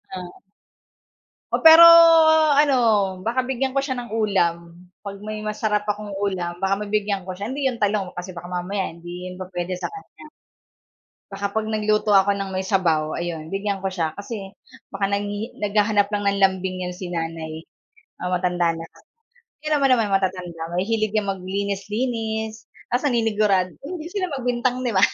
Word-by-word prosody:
Oh. 180 -1 -8 1.1
Oh, - - -1
pero 325 +1 +10 0.8
ano, 290 -2 +4 0.5
baka 235 +4 0
bigyan 265 0 -1
ko 275 - +1
siya 275 -1 -2
ng 240 -3 -7
ulam, 175 -5 -1 0.2
'pag 200 -1 -7
may 215 0 -5
masarap 210 0 -2
akong 210 0 -3
ulam 180 -4 -2
baka 195 +1 +1
mabigyan 205 -2 -1
ko 185 - -6
siya. 195 +3 -6
Hindi 275 +4 -4
'yon 235 - -8
talong, 205 -3 0
kasi 180 0 -8
baka 175 +1 -9
mamaya 185 +2 -2
hindi 175 +2 -8
yun 180 - -11
pupuwede 180 -1 -5
sa - - -2
kanya. 405 -6 -13 1.0
Baka 200 0 -3
'pag 220 +1 -2
nagluto 215 -1 +1
ako 195 +1 +5
ng 195 -1 -4
may 190 - -1
sabaw 165 -6 +1
ayun, 165 -2 -5
bigyan 195 0 -2
ko 190 - -1
siya, 165 -4 -2
kasi 200 -1 -7 0.3
baka 195 0 -2
nanghihi 205 +3 -3
naghahanap 210 0 +2
lang 205 0 -2
ng 200 0 +1
lambing 190 -1 +1
yun 180 - -6
si 180 -1 -7
Nanay. 165 -1 -5 0.6
Oo, 180 - -2
matanda 180 -1 +1
na 165 0 -5
ka - - -24 0.7
Tignan 305 -1 +1
mo 275 - +4
nama'y 230 -6 +2
matatanda, 185 -3 -1
mahihilig 215 +3 0
yang 205 -2 +1
maglinis-linis, 215 +4 -3 0.2
tas 250 +4 +1
naninigurad 210 -6 +1
hindi 320 +2 -7
sila 380 -2 -2
magbintang 250 0 -1
'di 245 - 0
ba? 190 - +2
200 Hz, 165 wpm, -22 LUFS, 180-220 Hz, 1.1 s, pero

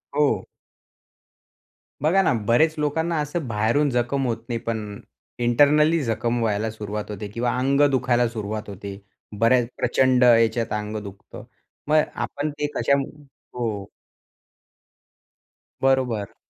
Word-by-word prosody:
हो. 140 -10 +2 1.6
बघा 175 +6 +4
ना, 185 - +2
बरेच 155 +7 +4
लोकांना 160 +3 0
असं 150 0 -3
बाहेरून 115 +7 +1
जखम 125 +2 0
होत 115 - -1
नाही 115 -1 -1
पण 105 -3 -4 0.4
इंटरनली 150 +7 +4
जखम 115 0 -1
व्हायला 110 0 0
सुरुवात 105 -1 -6
होते 105 0 -6
किंवा 120 +4 -2
अंग 135 +3 +2
दुखायला 125 -2 +2
सुरुवात 110 -2 -5
होते. 100 0 -7 0.4
बऱ्याच 120 +1 +4
प्रचंड 130 0 +3
याच्यात 115 -1 +3
अंग 105 0 -3
दुखतं. 100 -1 -11 0.4
मग 155 +1 +5
आपण 150 +2 -3
ते 150 - 0
कशा 140 - +2 0.6
हो. 110 -5 -3 2.0
बरोबर. 130 -6 +1
120 Hz, 115 wpm, -23 LUFS, 110-140 Hz, 2.0 s, मग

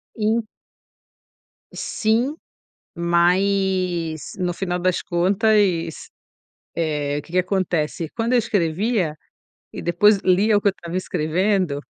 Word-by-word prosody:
In 220 +1 0 1.3
Sim, 235 +6 0 0.6
mas 175 -2 +1
no 180 -2 -1
final 180 -1 -2
das 180 0 0
contas, 185 -2 +1 0.7
eh, 150 -3 -1
o - - -6
que 170 - -17
que 180 - +2
acontece: 175 -4 -1
quando 230 +2 0
eu - - +5
escrevia 185 -3 0 0.6
e - - -6
depois 195 +4 +4
lia 200 +4 +3
o - - 0
que 200 - +3
eu - - 0
estava 170 -2 -8
escrevendo, 180 -2 0
185 Hz, 115 wpm, -22 LUFS, 170-205 Hz, 1.3 s, eu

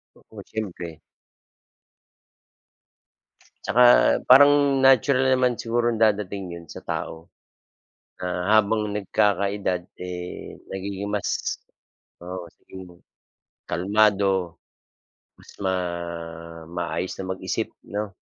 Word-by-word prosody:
Oo, - - -13
siyempre. 85 -6 -6 2.6
Tsaka 125 - +3 0.4
parang 140 0 +6
natural 130 0 +4
naman 125 -1 +2
siguro 120 +1 -1
dadating 100 -4 0
yun 85 - -14
sa - - -10
tao. 80 +1 -5 0.9
Ah, 90 0 -3
habang 110 0 +2
nagkakaedad 100 -2 0 0.2
eh, 90 0 -7 0.2
nagiging 100 +1 -4
mas 105 -1 -2 0.6
oo 90 -1 -6
sabihin 95 +3 -13
mong, 85 0 -18 0.7
kalmado. 95 -2 +2 0.8
Mas - - -16
ma 95 -2 -1 1.0
maayos 85 +1 -3
na 95 - -5
mag-isip 95 - -4
'no. 105 0 -5
100 Hz, 90 wpm, -24 LUFS, 90-110 Hz, 2.6 s, parang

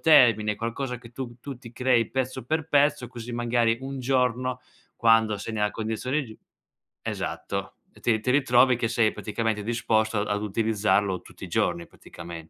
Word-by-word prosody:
termine, 115 -9 +5
qualcosa 125 +3 -3
che 115 -1 -13
tu 120 -2 -6
tu 140 +3 -7
ti 120 -2 -11
crei 120 -1 +2
pezzo 130 -1 -2
per 160 0 -1
pezzo, 145 -4 +3
così 120 0 -8
magari 120 -1 +1
un 135 0 -5
giorno, 125 0 0 0.4
quando 115 -2 +4
sei 100 +3 -6
nella 105 -1 0
condizione 115 +7 -2
giu 110 -3 -11 0.7
esatto, - - -4 0.3
ti 110 -2 +2
ti 125 +4 0
ritrovi 130 -2 +5
che 115 -1 -1
sei 115 -2 +2
praticamente 105 0 -2
disposto 110 -1 +1
a 105 - -2
ad 105 - -2
utilizzarlo 105 -3 +1
tutti - - -11
i - - -9
giorni, 85 - 0
praticame 85 -1 -10
115 Hz, 165 wpm, -26 LUFS, 110-125 Hz, 0.7 s, termine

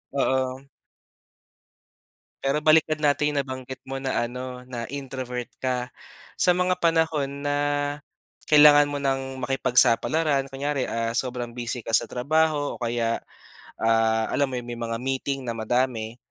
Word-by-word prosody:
Oo. 130 0 0 1.8
Pero 140 +2 +1
balikan 155 0 +4
natin 150 0 +2
yung 145 - 0
nabanggit 130 -1 -5
mo 135 - -4
na 120 -3 0
ano, 125 0 -7
na 120 -2 -5
introvert 130 -3 -5 0.2
ka. 125 -1 -1 0.5
Sa 180 - +3
mga 180 +1 +1
panahon 160 -5 +1
na 145 0 -1 1.0
kailangan 145 -1 +7
mo 145 - -2
ng 135 -1 -2
makipagsapalaran, 135 +3 +2
kunyari, 140 0 -1
ah, 115 -1 -2
sobrang 125 -2 -3
busy 120 0 -3
ka 115 -1 0
sa - - +3
trabaho 150 +3 0
o - - -14
kaya, 115 -1 -1 0.6
ah, 110 0 +2
alam 140 -1 +1
mo - - -3
iyun, 120 - -10
may 120 - -5
mga 115 -1 -3
meeting 135 +2 -2
na - - 0
madami. 115 0 -1
130 Hz, 140 wpm, -25 LUFS, 120-145 Hz, 1.8 s, kailangan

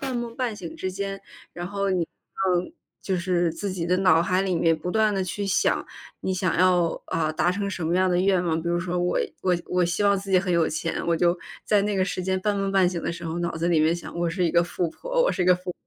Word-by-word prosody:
半 265 -2 -3
梦 235 -1 -4
半 245 -4 -1
醒 180 -5 -8
之 185 - -3
间， 195 0 -4 0.3
然 175 0 -5
后 200 +1 -1
你， 185 -2 +1
呃， 180 +1 -2 0.3
就 190 - -1
是 175 -1 +1
自 195 +5 -4
己 180 -3 -3
的 180 +1 +2
脑 185 -4 +5
海 185 +2 +1
里 190 -2 0
面 165 0 +3
不 170 +3 -4
断 215 +1 +2
地 195 - 0
去 200 +2 -3
想， 185 - +1 0.3
你 190 - -1
想 185 -3 0
要， 180 -2 +3
啊， 160 -1 0
达 175 +3 +1
成 200 +1 -2
什 175 -4 -3
么 170 - +1
样 185 +1 +3
的 175 - +2
愿 190 -1 +3
望。 160 -1 0
比 170 - -3
如 175 0 +1
说， 180 0 -2
我 175 0 +1 0.2
我 180 -1 +2
我 180 0 +1
希 175 +4 -1
望 200 -1 +4
自 195 +1 -9
己 185 - +5
很 180 -1 -1
有 170 -2 +3
钱， 160 +1 -3
我 170 -1 +2
就 175 +1 +2 0.3
在 210 -2 +3
那 205 0 0
个 190 -1 +2
时 185 - -3
间 190 +1 -1
半 205 +1 0
梦 195 0 -1
半 190 -2 +4
醒 175 -2 -3
的 - - -2
时 170 0 -8
候， 165 +1 -3
脑 170 0 -1
子 165 +1 0
里 170 -2 +3
面 155 +2 +3
想： 175 0 -8
“我 170 0 +1
是 180 +2 -1
一 170 - +2
个 170 +1 +3
富 175 0 -2
婆， - - -1
我 - - +3
是 - - -1
一 - - +1
个 180 0 +6
富 180 0 -6
婆。” - - -4
180 Hz, 305 characters per minute, -25 LUFS, 170-195 Hz, 0.3 s, 个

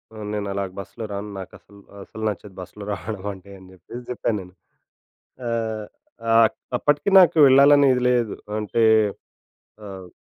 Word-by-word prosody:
ఆహ్, 105 -1 -7
నేనలా 100 -1 -3 0.2
బస్‌లో 110 +4 -8
రాను. 100 +1 -5
నాకసలు 100 +2 -13 0.2
అసలు 110 - -10
నచ్చదు 100 -1 -8
బస్‌లో 95 +3 -10
రావడమంటే 100 0 -6
అని 95 - -16
జెప్పేసి 105 +7 -11
చెప్పాను 115 -3 -2
నేను. 90 0 -14 1.0
ఆహ్, 110 -2 -3 0.4
ఆహ్ 115 0 +6
అక్ - - -7 0.2
అప్పటికి 145 +6 +1
నాకు 170 -2 +4
ఎళ్ళాలని 140 +1 +6
ఇది 125 - -2
లేదు. 120 -4 0 0.2
అంటే 110 +2 0 1.0
ఆహ్ 95 -2 -9
105 Hz, 135 wpm, -22 LUFS, 100-115 Hz, 1.0 s, ఆహ్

